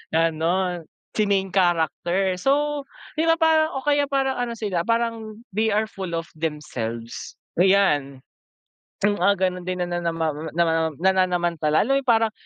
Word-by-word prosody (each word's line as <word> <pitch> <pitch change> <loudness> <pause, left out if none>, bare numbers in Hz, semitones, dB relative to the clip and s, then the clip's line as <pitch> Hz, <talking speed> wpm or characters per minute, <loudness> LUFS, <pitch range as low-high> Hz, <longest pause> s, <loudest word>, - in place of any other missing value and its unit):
Ganun. 165 +2 +1 0.3
Si 215 - +3
main 195 -1 +1
character. 180 +1 +1
So, 290 +1 +1 0.3
'yon 330 +1 +2
nga - - -1
parang 315 -1 +4
o - - -3
kaya 290 -1 +3
parang 270 -1 0
ano 240 -1 -2
sila, 195 -6 -1
parang 230 -1 -2
they 220 +2 +1
are 215 +1 +2
full 190 -5 -6
of 165 - -5
themselves, 125 -8 -5 0.2
ayan. 150 -9 +3 0.9
Hmm, 205 0 +3
ah, 200 +2 +5
ganun 180 -1 -1
din 185 0 -3
na 175 - -2
na 175 0 -2
namaw 165 -2 0
oh, 155 +2 -7
na 170 - +4
ma 165 - +1 0.2
mam - - -13
nananamanta. 180 -4 +1
Alam 225 +12 +3
mo - - 0
yung 260 - -27
parang 225 -2 +3
185 Hz, 175 wpm, -23 LUFS, 165-225 Hz, 0.9 s, ah